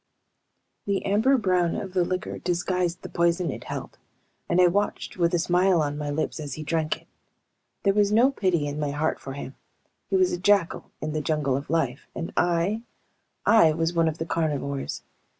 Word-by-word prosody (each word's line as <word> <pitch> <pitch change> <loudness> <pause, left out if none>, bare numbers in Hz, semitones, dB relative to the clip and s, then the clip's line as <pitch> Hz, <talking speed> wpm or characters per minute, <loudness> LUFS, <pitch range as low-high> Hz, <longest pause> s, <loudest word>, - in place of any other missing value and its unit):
The 200 -1 0
amber 220 +8 +3
brown 180 -6 +1
of 190 -2 -5
the 180 -2 +3
liquor 185 +1 -3
disguised 180 0 -1
the - - -5
poison 170 0 +1
it - - -8
held, - - -6 0.5
and 175 - +2
I 180 - +7
watched 200 +3 0
with 170 -1 +2
a - - +3
smile 180 +1 +3
on 145 -1 0
my 145 0 -4
lips 155 +2 -2
as 145 -4 -5
he 155 - -6
drank 155 0 -1
it. - - -33 0.8
There 195 - +3
was 205 0 +3
no 240 +6 +5
pity 185 - 0
in 145 +1 -4
my 145 -1 -1
heart 150 +3 -1
for 135 - -7
him. 140 -1 -7 0.6
He - - +1
was 370 -1 +3
a 175 - -2
jackal 195 -2 +2
in 155 0 -3
the 155 - -1
jungle 150 -4 0
of 140 +2 -4
life, 140 -5 -1
and 165 - -5
I... 175 +5 +1 0.6
I 165 -9 +6
was 165 +2 0
one 165 -1 +3
of 160 0 -1
the 165 - -3
carnivores. 145 -4 -2
170 Hz, 195 wpm, -25 LUFS, 155-185 Hz, 0.8 s, I